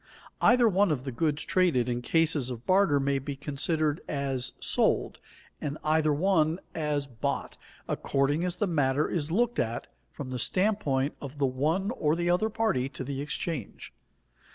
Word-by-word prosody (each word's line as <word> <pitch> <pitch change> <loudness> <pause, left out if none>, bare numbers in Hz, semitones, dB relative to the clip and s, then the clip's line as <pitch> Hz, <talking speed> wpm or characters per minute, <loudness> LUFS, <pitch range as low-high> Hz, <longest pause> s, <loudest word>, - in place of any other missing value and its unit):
_ - - -35 0.4
Either 240 0 +5
one 200 -1 +3
of 140 -5 -1
the 135 - -4
goods 150 +3 -1
traded 170 -10 +2
in 120 0 -1
cases 155 -2 +1
of 120 -1 -7
barter 185 -6 +4
may 140 0 +1
be 140 +1 -5
considered 145 +2 -1
as 135 -3 -2
sold, - - +1 0.4
and 145 0 -3
either 155 0 +2
one 160 +1 +2
as 150 -3 -1
bought, 120 -5 -3 0.3
according 140 +4 0
as 180 -1 -1
the 205 - 0
matter 145 -5 +1
is 155 -3 -2
looked 235 +7 +1
at 115 0 -1 0.3
from 135 -3 -7
the 125 - -3
standpoint 150 - +1
of 140 0 -8
the 140 - +2
one 155 - 0
or 155 -9 +1
the 175 +1 +1
other 215 +5 +2
party 215 - 0
to 135 - -6
the 135 +1 -4
exchange. 150 - -5
150 Hz, 170 wpm, -28 LUFS, 135-175 Hz, 0.4 s, Either